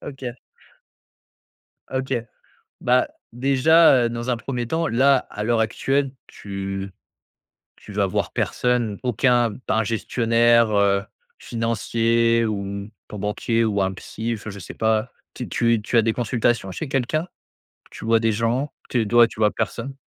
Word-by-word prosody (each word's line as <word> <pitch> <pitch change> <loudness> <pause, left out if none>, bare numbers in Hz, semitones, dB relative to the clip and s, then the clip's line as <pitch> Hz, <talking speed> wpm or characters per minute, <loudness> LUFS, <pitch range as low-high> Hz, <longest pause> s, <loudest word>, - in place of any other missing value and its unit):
OK. 135 -2 -8 1.6
OK. 130 0 -2 0.7
Bah, 125 +1 +3 0.3
déjà, 135 +1 +5
heu, - - 0
dans 120 +1 -4
un 120 - +1
1er 120 -1 -4
temps 165 +2 0
là, 135 +3 +4
à 105 - -5
l'heure 115 0 +1
actuelle 135 +5 0 0.2
tu 100 -1 -6 0.9
tu 105 - -12
vas 100 -1 +2
voir 95 - -2
personne? 120 -4 0
Aucun 120 -2 +2
pas - - 0
un 110 - +2
gestionnaire, 115 +1 +2
heu, 100 -1 +3 0.4
financier 115 0 +1
ou 100 -1 -4 0.2
ton 105 - -8
banquier 115 +3 0
ou 100 -2 0
un 95 0 +1
psy? 115 +4 -4
Fin 110 - -8
je 100 - -9
sais - - -9
pas. 110 +2 +1 0.2
T 125 - -6
tu 115 -2 +1
tu 115 +2 0
as - - +7
des 110 0 +1
consultations 120 -4 0
chez 155 - -5
quelqu'un? 145 +6 -1 0.6
Tu - - -9
vois 115 0 +4
des 115 0 +1
gens? 120 +6 -1 0.2
Tu 120 - +1
es 110 - -1
d 115 +4 -3
ouais, 120 -1 +8
tu 110 - -13
vois 105 -1 +4
personne? 135 +3 -4
115 Hz, 160 wpm, -22 LUFS, 105-125 Hz, 1.6 s, ouais